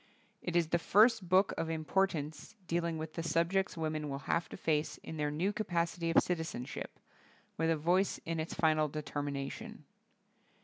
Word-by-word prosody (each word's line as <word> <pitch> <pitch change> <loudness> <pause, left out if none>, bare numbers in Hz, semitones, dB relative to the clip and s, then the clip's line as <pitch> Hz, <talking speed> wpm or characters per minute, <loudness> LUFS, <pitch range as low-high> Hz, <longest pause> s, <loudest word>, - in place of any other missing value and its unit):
It 175 - -3
is 170 -2 +3
the 170 - +2
first 215 +1 +4
book 190 +2 +4
of 165 - -1
im 160 -1 -3
portance 170 +1 -1
dealing 170 -1 -1
with 155 0 -5
the 165 - -3
subjects 170 +3 +1
women 155 -2 -2
will 135 - -3
have 170 - 0
to - - -8
face 155 -1 0
in 160 - -6
their 150 -1 0
new 175 +8 0
capacity 170 -5 -1
of 165 - +5
citizenship, 160 -8 -4 0.6
with 165 +1 +1
a 165 - +3
voice 180 +6 +2
in 165 0 -2
its 160 - -3
final 155 -1 +3
determination. 145 -2 -5
165 Hz, 170 wpm, -33 LUFS, 155-175 Hz, 0.6 s, of